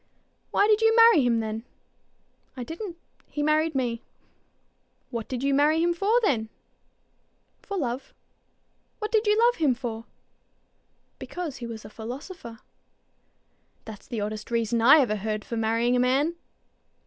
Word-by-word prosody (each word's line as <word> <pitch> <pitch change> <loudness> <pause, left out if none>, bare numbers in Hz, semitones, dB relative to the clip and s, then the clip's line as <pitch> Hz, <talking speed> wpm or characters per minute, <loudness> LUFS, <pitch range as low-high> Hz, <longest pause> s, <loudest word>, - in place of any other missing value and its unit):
"Why 405 - +3
did 430 +1 +3
you 450 0 +4
marry 460 -8 +7
him 235 -2 +2
then?" 220 0 -4 1.0
"I 250 - -4
didn't. 335 - -7 0.3
He 295 - -3
married 310 +1 +1
me." 240 -3 -1 1.1
"What 230 -3 -4
did 255 0 -4
you 275 0 +2
marry 295 +3 +3
him 345 0 +2
for 405 +7 +2
then?" 225 - +1 1.1
"For 400 - -5
love." 255 -4 -3 0.9
"What 425 -1 -4
did 440 -1 +2
you 420 0 +4
love 480 +1 +3
him 290 -6 +2
for?" 230 -2 -6 1.1
"Because 340 -6 -6
he 240 - -6
was 225 -2 -8
a - - -9
philosopher." 235 - -8 1.2
"That's 220 -2 -10
the 230 -4 -4
oddest 215 +1 -5
reason 230 0 0
I 275 +6 +7
ever 215 -5 0
heard 215 +1 -3
for 235 - -5
marrying 230 +2 +1
a - - +2
man." 270 +6 +2
255 Hz, 150 wpm, -26 LUFS, 230-340 Hz, 1.2 s, marry